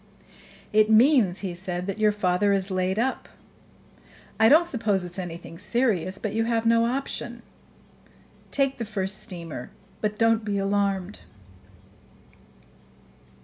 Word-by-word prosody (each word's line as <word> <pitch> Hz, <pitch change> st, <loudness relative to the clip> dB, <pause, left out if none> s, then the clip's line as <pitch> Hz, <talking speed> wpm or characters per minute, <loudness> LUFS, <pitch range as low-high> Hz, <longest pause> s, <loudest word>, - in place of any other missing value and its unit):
"It 215 Hz, 0 st, +4 dB
means," 220 Hz, -, +4 dB
he 190 Hz, -3 st, -4 dB
said, 180 Hz, 0 st, -4 dB
"that 200 Hz, +2 st, -4 dB
your 215 Hz, -1 st, +4 dB
father 200 Hz, 0 st, +1 dB
is 195 Hz, 0 st, -1 dB
laid 185 Hz, +1 st, 0 dB
up. 260 Hz, +4 st, -1 dB, 1.1 s
I 220 Hz, 0 st, +6 dB
don't 330 Hz, +5 st, +6 dB
suppose 215 Hz, -, 0 dB
it's 180 Hz, +2 st, -6 dB
anything 170 Hz, -1 st, -7 dB
serious; 195 Hz, -5 st, 0 dB
but 210 Hz, 0 st, -4 dB
you 225 Hz, +1 st, 0 dB
have 230 Hz, -1 st, 0 dB
no 230 Hz, 0 st, +4 dB
option. 240 Hz, -2 st, -4 dB, 1.1 s
Take 275 Hz, -2 st, 0 dB
the 230 Hz, -, -2 dB
first 195 Hz, -2 st, -2 dB
steamer; 170 Hz, -, -7 dB, 0.3 s
but 210 Hz, 0 st, -1 dB
don't 225 Hz, 0 st, +3 dB
be 205 Hz, -1 st, -2 dB
alarmed." 195 Hz, -, -1 dB
205 Hz, 130 wpm, -25 LUFS, 185-230 Hz, 1.1 s, I